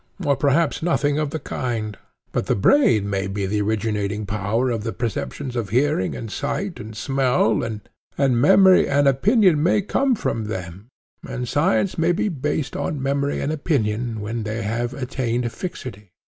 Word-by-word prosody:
or 140 -1 +3
perhaps 145 +3 +1
nothing 150 -3 +1
of 155 -2 -1
the 160 - -3
kind—but 115 -7 -5
the - - +2
brain 110 - +4
may 100 -1 -1
be 100 0 -2
the 105 +2 0
originating 105 0 -1
power 105 +5 -1
of 115 -3 -2
the 115 - -2
perceptions 125 +3 -4
of 115 -5 -2
hearing 125 -3 +1
and 115 -2 -6
sight 170 - -3
and 110 0 -8
smell, 125 -4 +1
and 110 -2 -4 0.6
memory 185 +6 +6
and 140 0 +3
opinion 180 - +4
may 180 +6 +3
come 255 +6 +1
from 115 - -2
them, 95 -1 -6 0.4
and 125 0 -4
science 180 +6 +1
may 165 +2 +3
be 175 +4 0
based 150 -2 -2
on 150 - -2
memory 140 +1 -1
and 145 - -1
opinion 120 -7 -1
when 110 +3 -3
they 110 +1 -3
have 120 +4 -2
attained 125 -2 -2
fixity. 120 - -7
125 Hz, 160 wpm, -22 LUFS, 110-145 Hz, 0.6 s, memory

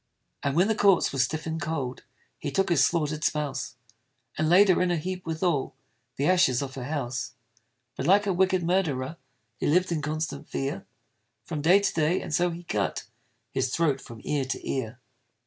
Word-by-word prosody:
And 140 0 -1
when 180 +4 +4
the 220 - +2
corpse 200 -4 +4
was 135 - +1
stiff 155 +3 -5
and 160 -1 -3
cold, 140 -5 -3 0.3
He 145 - -3
took 195 +7 +1
his 155 -6 +4
slaughter'd 155 -2 0
spouse, 145 -3 -1 0.6
And 155 0 0
laid 195 +4 +6
her 185 - +4
in 180 - +2
a 175 - +1
heap 180 +2 -5
with 160 +2 -3
all 160 -7 0 0.4
The 140 - -1
ashes 145 -8 +3
of 135 -1 -6
her 130 -2 -6
house. 135 -3 -3 0.6
But 135 - -3
like 200 +3 +5
a 195 - +1
wicked 185 0 +2
murderer, 165 -5 0 0.4
He - - -1
lived 180 +4 +3
in 160 -3 0
constant 155 +2 -4
fear 135 +1 -3 0.6
From 155 -4 -4
day 180 +6 +5
to 200 - 0
day, 160 +3 +2
and - - -6
so 175 +3 +3
he 170 +1 -7
cut 105 - -2 0.5
His - - 0
throat 145 -2 +1
from 115 -2 -11
ear 145 -3 -1
to 130 - -5
ear. 125 -2 -3
155 Hz, 195 wpm, -27 LUFS, 135-180 Hz, 0.6 s, laid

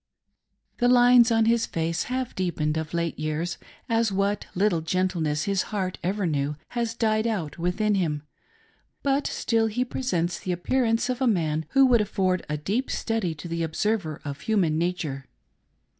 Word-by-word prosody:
The 245 - +3
lines 245 -1 +6
on 225 -1 +4
his 230 0 +2
face 165 +1 -1
have 255 0 -3
deepened 165 -5 -1
of 160 -1 -3
late 170 -2 -2
year 155 +1 -1
s, 175 0 -4 0.3
as 230 -2 +2
what 200 +1 0
little 190 -2 +2
of 160 - -10
gentleness 165 -4 0
his 195 -2 +1
heart 190 -3 -2
ever 195 +3 0
knew 145 -2 -1
has 235 -1 -2
died 220 -1 +1
out 175 -9 -3
within 195 +5 +1
him; 155 -7 0 0.8
but 280 +1 +1
still 225 -1 +1
he 245 +4 -1
presents 175 -10 -1
the 185 - -2
appearance 225 +6 +1
of 255 0 -2
a 260 - +3
man 160 -7 0
who 270 0 +6
would 245 -4 +5
afford 190 -3 0
a 150 - -1
deep 205 - -2
study 220 -8 -1
to 155 - -8
the 170 0 -3
observer 165 0 -1
of 140 -1 -5
human 175 -8 +1
nature. 160 -6 -2
185 Hz, 175 wpm, -26 LUFS, 165-225 Hz, 0.8 s, lines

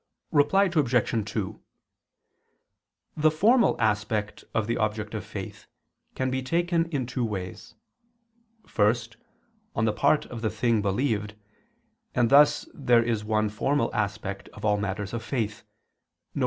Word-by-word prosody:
Reply 150 +7 +4
Obj. 125 - +1
2: 105 -1 -4 1.5
The 155 0 +4
formal 220 +11 +3
aspect 105 -1 -1
of 115 - 0
the 115 +2 -1
object 110 0 -2
of 110 -4 -4
faith - - -8 0.5
can 130 0 -1
be 130 0 -1
taken 170 +4 +1
in 140 -6 -2
two 125 +1 -3
ways: 95 -5 -5 0.9
first, 115 +1 0 0.6
on 110 - +1
the 110 - +1
part 145 +5 +2
of 115 -2 -8
the 110 - 0
thing 115 +2 +1
believed, 105 0 -1 0.8
and 120 -2 +2
thus 145 +1 +5
there 120 -4 +3
is 115 -3 -1
one 110 0 +1
formal 135 +8 0
aspect 100 -1 -3
of - - -7
all 105 -1 +3
matters 100 +1 -3
of 115 - -3
faith, 110 -6 -3 0.7
viz. - - -4
115 Hz, 140 wpm, -26 LUFS, 105-135 Hz, 1.5 s, thus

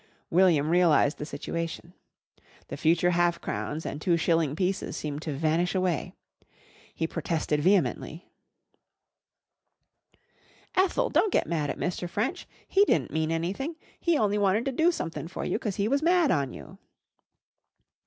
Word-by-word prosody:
William 165 -4 +4
realised 170 -4 +3
the 150 - -5
situation. 165 +3 -5 0.8
The - - -4
future 170 +2 +2
half 175 -1 +2
crowns 155 +2 -4
and 150 - -5
two 170 0 +2
shilling 165 -3 +1
pieces 185 +2 -2
seemed 150 -1 -4
to 155 - -4
vanish 165 +5 0
away. 185 -4 -1 0.8
He - - -1
protested 160 -2 -1
vehemently. 170 - +1 2.5
"Ethel, 390 +7 +1
don't 425 - +3
get - - +2
mad 155 -4 -1
at - - -3
Mr. 180 0 -3
French. 255 - -2 0.2
He 395 - +4
di'n't - - +1
mean 160 0 0
anything! 190 - -2 0.2
He 340 -3 +2
only 210 -3 +1
wanted 205 +3 +2
to 270 - 0
do 320 +6 +3
sumthin' 160 - -5
for 175 - -5
you - - -1
'cause 210 -5 -3
he 200 - 0
was 280 +4 +1
mad 340 -2 +3
on 140 -5 0
you." - - -11
175 Hz, 145 wpm, -27 LUFS, 160-205 Hz, 2.5 s, William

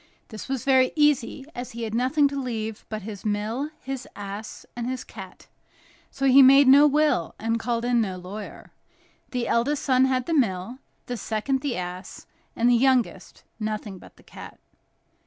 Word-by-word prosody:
This 220 +3 -9
was 265 -3 -3
very 260 -1 +4
easy, 295 -3 +1
as 245 -1 -7
he 235 0 -5
had 220 -1 -4
nothing 260 +5 +2
to 280 0 -4
leave 225 -4 -5
but 215 -2 -5
his 205 -2 -8
mill, 215 +7 -2
his 265 -1 -6
ass, 205 +2 -8
and 240 0 -3
his 255 0 -4
cat; - - -12 0.6
so 275 - -3
he 270 +1 +7
made 275 +1 +7
no 285 +3 +8
will, 295 - +1
and 225 +1 -1
called 235 +1 -2
in 245 -1 +2
no 190 -4 -3
lawyer. 195 +3 -9 0.6
The 245 -2 -2
eldest 275 +5 0
son 260 -1 +3
had 255 -1 0
the 330 - -2
mill; 230 - 0 0.3
the 245 - -4
second, 225 +6 -2
the 280 -7 -2
ass; 180 +1 -7 0.3
and 235 - +2
the 245 - +5
youngest, 255 0 +1 0.2
nothing 215 -3 -4
but - - -16
the - - -20
cat. - - -12
245 Hz, 175 wpm, -25 LUFS, 215-265 Hz, 0.6 s, no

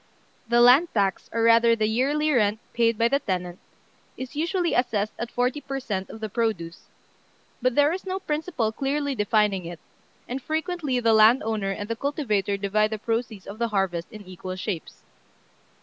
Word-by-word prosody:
The 240 0 +4
land 255 +8 +7
tax, 195 -3 0
or 230 - 0
rather 230 0 +5
the 215 -1 0
yearly 280 +8 +1
rent 215 -5 +2 0.2
paid 230 -1 +2
by 230 - +3
the 275 +3 +1
tenant, 180 -5 -3 0.6
is 260 +2 -7
usually 340 +3 0
assessed 215 -4 0
at 235 - -3
forty 250 +4 -1
per 275 -1 -4
cent. 195 -7 -4
of 220 - -10
the 220 - -2
produce; 205 -7 -3 0.7
but 255 0 +1
there 290 +2 +4
is 370 - -5
no 375 0 -3
principle 300 - -2
clearly 280 +4 -1
defining 210 -4 +1
it, 170 0 -7 0.5
and 260 +2 -4
frequently 315 -3 -2
the 230 -2 +3
landowner 220 -2 +4
and 205 +1 -4
the 230 - -2
cultivator 220 - -1
divide 210 +2 +1
the 220 - -3
proceeds 225 -2 -3
of 205 +3 -9
the 235 - +1
harvest 195 -3 -2
in 215 -2 -10
equal 185 0 -7
shapes. 185 -3 -6
230 Hz, 175 wpm, -25 LUFS, 205-270 Hz, 0.7 s, land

